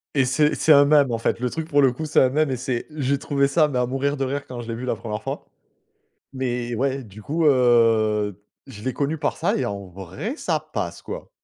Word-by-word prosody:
et 135 Hz, -2 st, +3 dB
c'est 150 Hz, +4 st, +2 dB
c'est 155 Hz, -, +5 dB
un 140 Hz, -, +7 dB
mème, 145 Hz, -3 st, +4 dB
en 115 Hz, -, 0 dB
fait, 115 Hz, -, -1 dB
le 125 Hz, 0 st, -1 dB
truc 160 Hz, +3 st, -5 dB
pour 145 Hz, -2 st, +4 dB
le 135 Hz, -2 st, +5 dB
coup, 155 Hz, +6 st, -5 dB
c'est 150 Hz, -, +3 dB
un 130 Hz, -, +4 dB
mème 150 Hz, +1 st, +1 dB
et 130 Hz, -, -1 dB
c'est 125 Hz, -1 st, -3 dB
j'ai 140 Hz, -2 st, 0 dB
trouvé 140 Hz, 0 st, +1 dB
ça, 155 Hz, +2 st, +3 dB
mais 130 Hz, -3 st, -1 dB
à 125 Hz, -, +2 dB
mourir 140 Hz, +3 st, -1 dB
de 135 Hz, -, -1 dB
rire 140 Hz, +2 st, -3 dB
quand 125 Hz, -1 st, -8 dB
je 115 Hz, -, -9 dB
l'ai 115 Hz, -, -3 dB
vu 120 Hz, -, -7 dB
la 125 Hz, -, 0 dB
1re 110 Hz, -1 st, -6 dB
fois. -, -, -5 dB, 0.9 s
Mais 125 Hz, -3 st, -3 dB
ouais, 135 Hz, +2 st, -1 dB
du 105 Hz, -1 st, -13 dB
coup, 160 Hz, +2 st, 0 dB
heu, 115 Hz, -6 st, +3 dB, 0.3 s
je 105 Hz, -, -11 dB
l'ai 130 Hz, 0 st, -2 dB
connu 145 Hz, +5 st, -1 dB
par 145 Hz, -1 st, -2 dB
ça -, -, +1 dB
et 130 Hz, -, -1 dB
en 100 Hz, -3 st, -5 dB
vrai, 95 Hz, -, -6 dB
ça -, -, -1 dB
passe -, -, -5 dB
quoi. -, -, -8 dB
130 Hz, 250 wpm, -23 LUFS, 115-145 Hz, 0.9 s, un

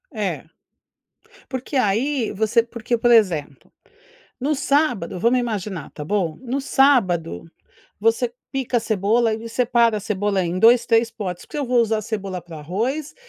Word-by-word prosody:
É. -, -, -3 dB, 1.1 s
Porque 260 Hz, +2 st, -5 dB
aí 250 Hz, +3 st, +1 dB
você 220 Hz, +3 st, +2 dB
porque, 235 Hz, 0 st, -3 dB
por 240 Hz, +1 st, +2 dB
exemplo, 170 Hz, -, +2 dB, 0.7 s
no 280 Hz, +4 st, 0 dB
sábado, 265 Hz, -, 0 dB
vamos 240 Hz, +6 st, +3 dB
imaginar, 205 Hz, -, -4 dB
tá 150 Hz, -, -8 dB
bom? 175 Hz, -3 st, -1 dB
No 265 Hz, +2 st, -3 dB
sábado, 235 Hz, -, +2 dB, 0.6 s
você 230 Hz, +2 st, +1 dB, 0.2 s
pica 260 Hz, -2 st, 0 dB
a -, -, -5 dB
cebola 220 Hz, +2 st, +1 dB
e 225 Hz, +1 st, -7 dB
separa 235 Hz, -2 st, +2 dB
a -, -, -8 dB
cebola 205 Hz, -2 st, -1 dB
em 175 Hz, +1 st, -2 dB
2, 235 Hz, +4 st, +5 dB
3 230 Hz, 0 st, +3 dB
potes. 190 Hz, -6 st, -6 dB
Porque 300 Hz, -, -7 dB
se -, -, 0 dB
eu -, -, -3 dB
vou 245 Hz, 0 st, +3 dB
usar 220 Hz, -1 st, +1 dB
cebola 195 Hz, -4 st, -4 dB
para 170 Hz, -2 st, -11 dB
o -, -, -8 dB
arroz, 240 Hz, -, -3 dB
225 Hz, 165 wpm, -22 LUFS, 195-245 Hz, 1.1 s, 2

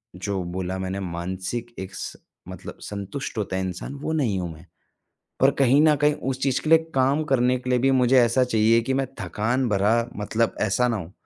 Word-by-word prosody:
जो 95 Hz, +1 st, -3 dB
बोला 95 Hz, 0 st, -3 dB
मैंने 95 Hz, +1 st, -3 dB
मानसिक 95 Hz, +6 st, -4 dB
एक 95 Hz, 0 st, -7 dB
स -, -, -6 dB, 0.3 s
मतलब -, -, -9 dB
संतुष्ट 100 Hz, +6 st, -6 dB
होता 100 Hz, -3 st, -2 dB
है -, -, -1 dB
इंसान, 95 Hz, +8 st, -5 dB
वो 145 Hz, +3 st, -3 dB
नहीं 120 Hz, -11 st, 0 dB
हूँ 90 Hz, -2 st, -4 dB
मैं। 80 Hz, +3 st, -15 dB, 0.8 s
और 135 Hz, +1 st, +6 dB
कहीं 135 Hz, +2 st, +5 dB
न 155 Hz, -1 st, +5 dB
कहीं 150 Hz, +1 st, +3 dB, 0.2 s
उस 130 Hz, -1 st, -3 dB
चीज़ 135 Hz, -2 st, +1 dB
के 155 Hz, -, -3 dB
लिए 165 Hz, -, +8 dB, 0.2 s
काम 135 Hz, +4 st, +2 dB
करने 130 Hz, -3 st, +2 dB
के 125 Hz, -, -6 dB
लिए 125 Hz, -1 st, +3 dB
भी 135 Hz, +2 st, +3 dB
मुझे 130 Hz, 0 st, +4 dB
ऐसा 120 Hz, +2 st, +3 dB
चाहिए 115 Hz, -1 st, +3 dB
कि 130 Hz, +3 st, -2 dB
मैं 135 Hz, 0 st, 0 dB
थकान 120 Hz, +5 st, -1 dB
भरा 105 Hz, +2 st, +3 dB, 0.2 s
मतलब 110 Hz, +2 st, 0 dB
ऐसा 110 Hz, +4 st, +2 dB
ना 115 Hz, -2 st, 0 dB
होऊँ 90 Hz, -3 st, -8 dB
115 Hz, 210 wpm, -24 LUFS, 95-130 Hz, 0.8 s, लिए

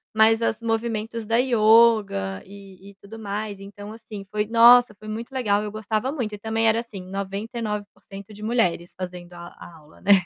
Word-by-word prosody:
mas 220 Hz, +1 st, +4 dB
as 230 Hz, 0 st, -1 dB
movimentos 225 Hz, 0 st, -2 dB
da 230 Hz, +1 st, +2 dB
ioga 220 Hz, -, +3 dB
e 195 Hz, -1 st, -14 dB
e -, -, -22 dB
tudo 210 Hz, +3 st, -12 dB
mais 205 Hz, -1 st, -5 dB
então 205 Hz, +1 st, -10 dB
assim 215 Hz, -3 st, -10 dB
foi, 210 Hz, 0 st, -1 dB
nossa, 235 Hz, -1 st, +6 dB
foi 215 Hz, -, -13 dB
muito 225 Hz, +4 st, -6 dB
legal 210 Hz, -6 st, 0 dB
eu 210 Hz, -, -5 dB
gostava 215 Hz, +4 st, -2 dB
muito 240 Hz, -8 st, -4 dB
e -, -, -5 dB
também 225 Hz, +1 st, 0 dB
era 220 Hz, +1 st, +3 dB
assim 230 Hz, -5 st, -8 dB
99% 200 Hz, 0 st, -6 dB
de 210 Hz, -, -13 dB
mulheres 200 Hz, -7 st, 0 dB
fazendo 180 Hz, -1 st, -7 dB
a 170 Hz, 0 st, -10 dB
a 170 Hz, -, -12 dB
aula, 155 Hz, 0 st, -19 dB
né. 200 Hz, -, +2 dB
215 Hz, 180 wpm, -23 LUFS, 195-225 Hz, -, nossa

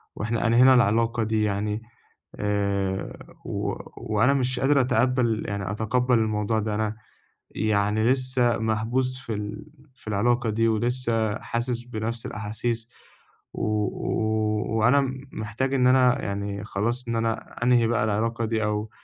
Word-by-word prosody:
وإحنا 115 Hz, +2 st, -1 dB
أنهينا 125 Hz, +3 st, +6 dB
العِلاقة 115 Hz, 0 st, +3 dB
دي 110 Hz, 0 st, 0 dB
يعني، 105 Hz, +1 st, -1 dB, 0.5 s
آآ 100 Hz, -2 st, -1 dB, 0.3 s
و -, -, -2 dB, 0.4 s
وأنا 110 Hz, +6 st, +4 dB
مش 130 Hz, -2 st, 0 dB
قادر 140 Hz, +1 st, +4 dB
أتقبل 125 Hz, -2 st, +1 dB
يعني 100 Hz, -1 st, -3 dB
أتِقبل 120 Hz, +3 st, +1 dB
الموضوع 110 Hz, 0 st, 0 dB
ده. 105 Hz, 0 st, -2 dB
أنا 110 Hz, 0 st, -1 dB, 0.6 s
يعني 105 Hz, 0 st, +1 dB
لسه 130 Hz, -1 st, +2 dB
محبوس 115 Hz, +4 st, 0 dB
في 120 Hz, -3 st, -5 dB
ال 105 Hz, +5 st, -5 dB, 0.3 s
في 125 Hz, -, -20 dB
العلاقة 120 Hz, +3 st, +1 dB
دي، 115 Hz, +2 st, +2 dB
ولسه 115 Hz, -1 st, 0 dB
حاسس 120 Hz, 0 st, -3 dB
بنفْس 115 Hz, -1 st, -4 dB
الأحاسيس، 110 Hz, +2 st, -3 dB, 0.6 s
و -, -, -3 dB, 0.2 s
و 110 Hz, +1 st, -1 dB
وأنا 125 Hz, +6 st, +5 dB, 0.3 s
محتاج 110 Hz, +5 st, -3 dB
إن 125 Hz, -1 st, +4 dB
أنا 125 Hz, -1 st, +4 dB
يعني 100 Hz, 0 st, -4 dB
خلاص، 115 Hz, +4 st, -2 dB
إن 115 Hz, -, -1 dB
أنا 115 Hz, 0 st, -3 dB
أنهي 120 Hz, -2 st, +4 dB
بقى 115 Hz, -1 st, +1 dB
العِلاقة 115 Hz, +2 st, 0 dB
دي، 110 Hz, 0 st, -1 dB
أو 105 Hz, 0 st, -1 dB
110 Hz, 135 wpm, -25 LUFS, 105-120 Hz, 0.6 s, أنهينا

